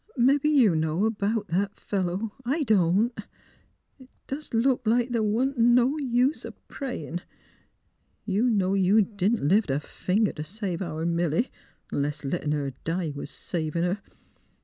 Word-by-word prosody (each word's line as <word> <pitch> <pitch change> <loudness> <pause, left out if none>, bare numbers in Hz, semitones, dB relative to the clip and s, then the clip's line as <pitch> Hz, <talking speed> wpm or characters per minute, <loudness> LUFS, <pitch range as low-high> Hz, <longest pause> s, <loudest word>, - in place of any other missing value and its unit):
Mebbe 270 +4 +3
you 265 - +5
know 160 +7 +1
'bout 210 0 -2
that 195 +4 0
fellow, 195 +2 -2
I 285 +6 0
don't.... 215 +1 +2 0.8
It 260 -1 -16 0.2
does 295 +3 -6
look 245 +3 +2
like 240 +2 +2
the' 230 -2 +1
wa'n't 240 +5 0
no 240 +4 +4
use 255 +1 +1
o' - - -7
prayin'. 175 - -5 1.0
You 215 +5 +1
know 195 -4 +2
you 195 +2 +4
didn't 200 -3 0
lift 200 +2 +3
a 135 +1 +1
finger 195 +7 -1
t' - - -6
save 185 +2 -4
our 160 -3 -3
Milly 170 - 0 0.2
— - - -36
'nless 145 +1 -2
lettin' 150 +1 -1
her 145 -2 -1
die 165 -2 -2
was 140 - -5
savin' 165 0 -2
her. 185 +3 -1
200 Hz, 150 wpm, -26 LUFS, 170-240 Hz, 1.0 s, you